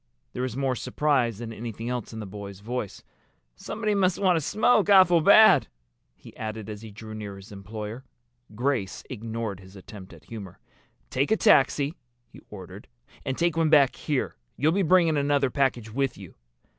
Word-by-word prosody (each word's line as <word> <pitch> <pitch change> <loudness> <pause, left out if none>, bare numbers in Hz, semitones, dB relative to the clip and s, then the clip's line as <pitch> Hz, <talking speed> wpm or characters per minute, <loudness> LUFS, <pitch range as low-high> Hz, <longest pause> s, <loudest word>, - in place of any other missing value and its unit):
There 125 - -4
was 130 -1 -3
more 135 -2 0
surprise 130 -5 0
than 115 0 -7
anything 115 0 -6
else 125 -2 -4
in 110 - -7
the 110 - -6
boy's 100 -1 -9
voice. 115 -2 -5 0.5
"Somebody 215 - -3
must 190 -3 +2
want 185 -3 +3
a 165 - +1
smoke 215 - +2
awful 185 -4 +6
bad," 215 +6 +7 0.5
he - - -15
added 110 -1 -6
as 105 0 -8
he 110 - -9
drew 110 +1 -10
near 105 -2 -7
his 95 +2 -13
employer. 105 +4 -7 0.5
Grace 120 -5 -2
ignored 115 -4 -5
his 95 +1 -15
attempt 95 0 -12
at - - -15
humor. 100 -5 -9 0.5
"Take 140 +2 0
a 220 - +3
taxi," 145 -6 +3 0.3
he - - -16
ordered. 95 0 -11 0.4
"And 135 -2 -2
take 170 -1 +1
one 165 -1 +2
back 145 -4 +5
here. 145 -4 -2 0.2
You'll 150 +4 +2
be 195 +4 +1
bringing 170 -3 +3
another 140 -2 +1
package 125 -5 0
with 135 0 -1
you." 95 -4 -11
125 Hz, 175 wpm, -26 LUFS, 105-150 Hz, 0.5 s, bad